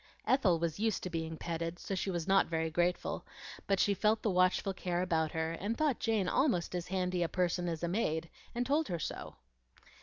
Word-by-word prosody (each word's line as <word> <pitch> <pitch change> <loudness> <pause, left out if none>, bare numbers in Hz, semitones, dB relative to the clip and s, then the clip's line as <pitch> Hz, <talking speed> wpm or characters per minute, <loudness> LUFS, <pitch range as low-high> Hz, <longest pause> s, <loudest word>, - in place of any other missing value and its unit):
Ethel 220 -10 +4
was 165 +1 -2
used 220 -2 0
to 185 - -4
being 160 -1 -3
petted, 165 0 -3
so 195 - -5
she 190 +1 -1
was 175 -2 -2
not 195 0 +4
very 160 -1 -1
grateful; 175 +2 0 0.4
but 195 -1 +2
she 205 - +4
felt 215 +3 +2
the 215 - +2
watchful 185 +1 +2
care 180 -1 -1
about 160 -3 0
her, 160 0 -1
and 205 +7 -3
thought 300 -5 +1
Jane 220 -4 +1
almost 185 - +1
as 175 -1 -3
handy 180 -1 -1
a 170 - +1
person 180 -1 0
as 165 0 -4
a - - +1
maid, 165 -4 0 0.3
and 245 +1 0
told 295 +4 +2
her 175 - -2
so. 160 - -5
180 Hz, 210 wpm, -33 LUFS, 165-200 Hz, 0.4 s, Ethel